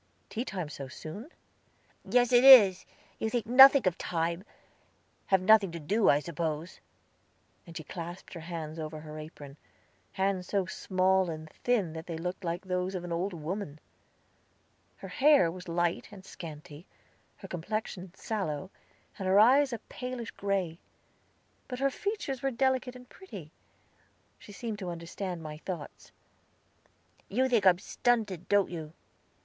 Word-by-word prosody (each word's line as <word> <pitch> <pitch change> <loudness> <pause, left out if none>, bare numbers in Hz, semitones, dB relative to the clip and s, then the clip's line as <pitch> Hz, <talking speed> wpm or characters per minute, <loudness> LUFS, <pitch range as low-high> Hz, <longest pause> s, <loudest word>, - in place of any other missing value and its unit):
"Tea 230 - -2
time 185 - -4
so 140 -2 -7
soon?" 160 - -9 0.7
"Yes, 245 0 +2
it 245 +1 +6
is. 210 -9 +9 0.3
You 220 - -1
think 235 -2 -1
nothing 265 +2 +8
of 185 -2 +1
time; 170 +2 -2 0.8
have 190 -1 +3
nothing 205 -2 +5
to 170 - -5
do, 200 +8 +2
I 145 - +6
suppose." 160 +1 -4 0.9
And 170 - -8
she 160 - -6
clasped 175 +3 -8
her 170 - -7
hands 165 -1 -6
over 155 0 -6
her 155 0 -8
apron 145 -2 -10 0.6
hands 190 -2 -1
so 195 -2 0
small 185 0 +1
and 155 -1 -6
thin 210 -10 0
that 160 0 -8
they 165 -2 -4
looked 180 +3 -5
like 170 +2 -3
those 180 +1 -2
of 180 - -4
an 175 - -6
old 175 +4 -1
woman. 165 -1 -5 1.2
Her - - -9
hair 280 - +4
was 180 +1 -10
light 175 0 -1
and 195 -2 -12
scanty, 155 0 -10 0.5
her - - -10
complexion 185 0 -4
sallow, 190 -5 -4 0.5
and 190 - -3
her 190 +2 +5
eyes 265 +5 +6
a 235 - -2
palish 250 -2 -6
gray; 190 -4 -2 0.9
but 250 - -5
her 275 +1 +1
features 400 - -3
were 270 - +1
delicate 260 0 0
and 250 0 -12
pretty. 380 +7 -11 0.9
She - - -13
seemed 215 0 -5
to 185 -3 -4
understand 170 +1 -5
my 150 -1 -7
thoughts. 170 -4 -7 1.2
"You 255 +6 +2
think 230 -6 +3
I - - +11
am 175 - +3
stunted, 210 -3 -1
don't 205 -2 +3
you?" 160 -3 -7
185 Hz, 155 wpm, -30 LUFS, 165-225 Hz, 1.2 s, I